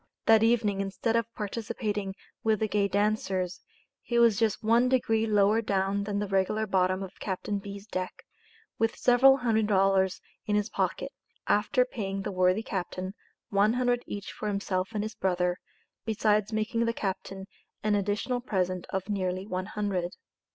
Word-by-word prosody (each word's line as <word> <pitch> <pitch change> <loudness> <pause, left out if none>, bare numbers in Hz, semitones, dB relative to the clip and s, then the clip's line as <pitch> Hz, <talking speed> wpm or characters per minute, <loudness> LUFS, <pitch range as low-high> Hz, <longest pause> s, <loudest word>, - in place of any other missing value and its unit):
That 225 -1 +6
evening, 225 -4 +2
instead 195 +4 -1
of 230 0 0
participating 210 -2 -3 0.3
with 220 -2 +2
the 220 - +1
gay 205 -1 +1
dancers, 195 -3 0 0.4
he 240 - -2
was 230 -3 +5
just 225 -2 +1
one 235 +3 +4
degree 225 -3 +2
lower 210 +1 +4
down 200 -1 0
than 205 -1 -2
the 205 0 -1
regular 195 +3 +1
bottom 185 -1 +1
of 190 0 -10
Captain 200 +1 -3
B's. 200 0 -8
deck, 185 -4 -5 0.6
with 225 0 +1
several 260 +2 +6
hundred 225 -4 +1
dollars 195 -2 +3 0.3
in 210 - +1
his 210 -1 0
pocket, - - -1 0.3
after 215 +4 +3
paying 195 -5 -4
the - - -3
worthy 185 +3 +2
captain 185 -1 -4 0.4
one 205 +2 +3
hundred 245 -1 +1
each 205 0 -6
for 215 - -5
himself 195 -2 -1
and 210 - 0
his 220 +1 -4
brother, 180 -1 0 0.4
besides 215 -1 +1
making 225 +2 0
the 230 - 0
captain 195 -2 -4 0.4
an 215 0 +2
additional 205 +5 0
present 185 -6 -1
of 190 0 -3
nearly 185 -2 -2
one 185 -2 -3
hundred. 195 -5 -2
205 Hz, 160 wpm, -28 LUFS, 190-220 Hz, 0.6 s, That